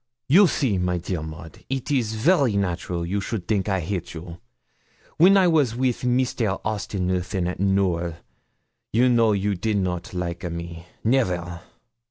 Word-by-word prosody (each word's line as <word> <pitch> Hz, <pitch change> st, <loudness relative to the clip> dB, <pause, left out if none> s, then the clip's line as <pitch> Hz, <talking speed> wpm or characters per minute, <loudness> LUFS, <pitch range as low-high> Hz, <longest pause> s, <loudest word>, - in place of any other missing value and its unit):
'You 185 Hz, +8 st, +7 dB
see, 120 Hz, -, 0 dB
my 90 Hz, 0 st, 0 dB
dear 85 Hz, -1 st, -3 dB
Maud, 80 Hz, 0 st, -9 dB
it 135 Hz, +1 st, -3 dB
is 115 Hz, -6 st, 0 dB
very 135 Hz, -, +3 dB
natural 90 Hz, -2 st, -2 dB
you 100 Hz, +4 st, -1 dB
should 100 Hz, -2 st, -4 dB
think 105 Hz, -2 st, 0 dB
I 95 Hz, -2 st, 0 dB
hate 90 Hz, 0 st, -4 dB
you. 85 Hz, +1 st, -8 dB, 0.8 s
When 190 Hz, +5 st, +7 dB
I 190 Hz, -2 st, +5 dB
was 145 Hz, -9 st, +2 dB
with 125 Hz, -1 st, 0 dB
Mr. 125 Hz, -5 st, 0 dB
Austin 100 Hz, -3 st, -2 dB
Ruthyn, 90 Hz, 0 st, -1 dB
at 90 Hz, -, -4 dB
Knowl, 95 Hz, -3 st, +1 dB, 0.8 s
you 125 Hz, +3 st, +4 dB
know 115 Hz, -3 st, +4 dB
you 100 Hz, +1 st, 0 dB
did 105 Hz, +3 st, -1 dB
not 90 Hz, -2 st, -2 dB
like 90 Hz, 0 st, -4 dB
a 90 Hz, -, -2 dB
me 85 Hz, 0 st, -7 dB, 0.2 s
never. 90 Hz, -8 st, 0 dB
95 Hz, 165 wpm, -24 LUFS, 90-120 Hz, 0.8 s, You